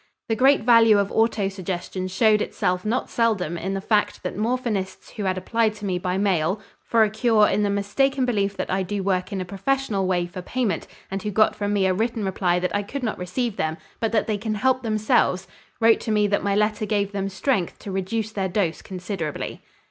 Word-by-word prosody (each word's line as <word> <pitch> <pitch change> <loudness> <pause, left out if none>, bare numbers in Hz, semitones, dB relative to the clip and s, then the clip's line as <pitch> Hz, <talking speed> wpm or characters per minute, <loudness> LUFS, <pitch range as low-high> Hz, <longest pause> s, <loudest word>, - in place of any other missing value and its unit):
The 225 - +2
great 270 +3 +4
value 230 -2 +6
of 200 -1 0
autosuggestion 195 -4 -1
showed 210 +2 +3
itself 180 -3 -1
not 230 +4 -1
seldom 210 -8 0
in 190 +3 -3
the - - -1
fact 210 +1 0
that - - -3
morphinists 215 -4 -2
who 210 - -5
had 185 0 0
applied 220 +3 0
to 210 -1 -7
me 185 -2 -1
by 180 0 -1
mail 190 -1 +1 0.2
for 230 -1 +3
a 215 - +2
cure 220 -1 +4
in - - +1
the 205 - +1
mistaken 255 +7 +1
belief 200 -5 0
that - - -3
I 190 +1 +1
do 195 +1 -3
work 185 -1 0
in 195 - -2
a 185 - -3
professional 200 +1 -1
way 175 -2 +1
for 175 +1 -7
payment 210 -4 -2 0.2
and 195 0 -3
who 210 - -3
got 215 +2 +3
from 205 0 -2
me 200 -2 +2
a 185 - +3
written 220 +1 -1
reply 185 -2 +1
that 180 +2 -1
I 205 - +1
could 260 +7 -6
not 220 - -2
receive 200 +5 -2
them, 160 0 -1 0.2
but 225 -2 0
that 225 - +2
they 210 -2 -1
can 215 0 -2
help 255 +4 +2
themselves, 215 -4 +1 0.3
wrote 225 -1 +5
to 220 - -3
me 210 -1 +3
that 200 - +1
my 200 0 +1
letter 210 +1 +1
gave 205 -2 0
them 195 -1 -2
strength 195 -2 -1
to 200 - -8
reduce 200 +3 -2
their 195 -3 -2
dose 175 -3 -1
considerably. 180 -4 -5
205 Hz, 215 wpm, -24 LUFS, 190-220 Hz, 0.3 s, value